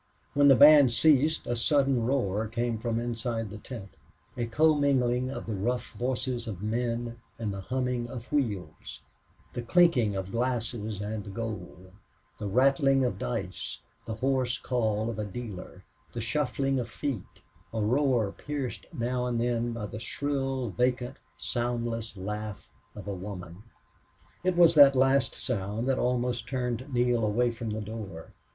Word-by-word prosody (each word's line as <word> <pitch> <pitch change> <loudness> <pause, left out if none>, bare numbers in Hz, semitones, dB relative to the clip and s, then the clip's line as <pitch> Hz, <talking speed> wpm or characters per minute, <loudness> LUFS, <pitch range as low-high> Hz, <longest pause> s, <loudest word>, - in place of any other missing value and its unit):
When 145 0 +5
the 135 - +8
band 145 -2 +8
ceased 150 +5 +3
a 120 - -1
sudden 135 -1 +2
roar 110 -5 0
came 115 0 -1
from 115 0 -1
inside 115 -2 -3
the 105 - -7
big - - -16
tent, 110 -7 -8 0.4
a 120 -2 -2
commingling 130 -2 +3
of 135 - -5
the 115 - -3
rough 120 +6 -2
voices 125 -1 -2
of 100 -3 -5
men 115 +1 -2 0.2
and 110 -3 -3
the 95 - -5
humming 125 +1 -2
of 125 -1 -8
wheels, 105 - -2 0.5
the 120 - -3
clinking 125 - +4
of 95 0 -4
glasses 115 -3 -2
and 105 -1 -5
gold, 95 -5 -6 0.5
the 105 - -3
rattling 135 +4 +4
of 120 -6 -2
dice, - - -4 0.3
the 110 - -3
hoarse 130 0 0
call 110 -3 0
of 110 - -6
a - - 0
dealer, 105 -2 -7 0.3
the 120 - -4
shuffling 135 +3 0
of 120 -1 -4
feet 125 -4 -5 0.3
a 110 - -3
roar 120 -1 +2
pierced 140 +1 -5
now 125 -3 -1
and 120 -1 -1
then 120 0 0
by 115 -2 -4
the 105 +1 -6
shrill, 135 -1 -2
vacant, 125 +3 0 0.2
soundless 115 - -2
laugh 105 +2 -5 0.2
of 105 -2 -9
a 100 - -2
woman. 90 -2 -7 0.8
It 185 -1 +2
was 170 -2 +7
that 140 -3 +8
last 135 0 +3
sound 110 -2 -2
which 135 -1 +1
almost 125 -1 0
turned 125 +1 -3
Neale 120 -2 +2
away 120 +3 +2
from 115 -1 -5
the 110 0 -3
door. 100 -6 -7
120 Hz, 155 wpm, -29 LUFS, 110-130 Hz, 0.8 s, the